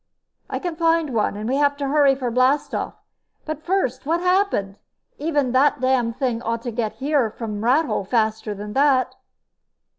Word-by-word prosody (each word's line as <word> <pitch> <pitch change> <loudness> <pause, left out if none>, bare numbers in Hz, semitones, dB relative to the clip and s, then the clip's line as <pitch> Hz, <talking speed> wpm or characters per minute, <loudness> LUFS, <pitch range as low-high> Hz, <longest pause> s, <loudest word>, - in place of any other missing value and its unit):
"I - - -2
can 350 -3 -4
find 330 -3 +1
one. 210 -2 0
And 215 +1 -4
we'll 265 +3 0
have 285 0 +2
to 280 -1 -2
hurry 280 -1 +4
for 255 -3 -3
blastoff. 255 +4 +1 0.5
But, 310 -1 -5
first, 305 -9 -1
what 330 +4 0
happened? 360 - 0 0.4
Even 290 -4 0
that 265 +3 +3
damned 255 -2 +1
thing 250 -4 -1
ought 230 0 -3
to 240 - -3
get 220 -2 -2
here 275 -4 0
from 215 -1 -6
Rathole 255 - +1
faster 220 -1 0
than 210 +1 -7
that." 270 -1 +3
260 Hz, 170 wpm, -22 LUFS, 230-295 Hz, 0.5 s, hurry